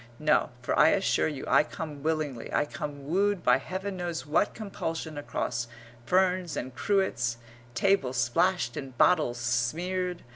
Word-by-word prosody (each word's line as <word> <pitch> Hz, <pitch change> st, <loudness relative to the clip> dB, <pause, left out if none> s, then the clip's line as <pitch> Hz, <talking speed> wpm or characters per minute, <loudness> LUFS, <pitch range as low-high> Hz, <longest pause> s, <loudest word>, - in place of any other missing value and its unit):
No, 150 Hz, +2 st, +2 dB
for -, -, 0 dB
I -, -, +7 dB
assure 195 Hz, -3 st, +2 dB
you 150 Hz, -4 st, -5 dB
I -, -, +5 dB
come 150 Hz, -2 st, -7 dB
willingly; 150 Hz, -6 st, -2 dB
I -, -, +2 dB
come 145 Hz, -1 st, -6 dB
wooed 195 Hz, +3 st, +1 dB
by -, -, +5 dB
Heaven 190 Hz, +1 st, -5 dB
knows 170 Hz, -6 st, -3 dB
what 155 Hz, +7 st, +1 dB
compulsion 165 Hz, -7 st, -4 dB
across 120 Hz, -4 st, -3 dB, 0.4 s
ferns 185 Hz, -2 st, +2 dB
and 130 Hz, +1 st, -4 dB
cruets, 125 Hz, -, 0 dB, 0.4 s
table 170 Hz, -3 st, +2 dB
splashed 125 Hz, +3 st, +1 dB
and 135 Hz, -3 st, -7 dB
bottles 150 Hz, -8 st, +3 dB
smeared. 170 Hz, +10 st, -1 dB
155 Hz, 145 wpm, -28 LUFS, 130-185 Hz, 0.4 s, I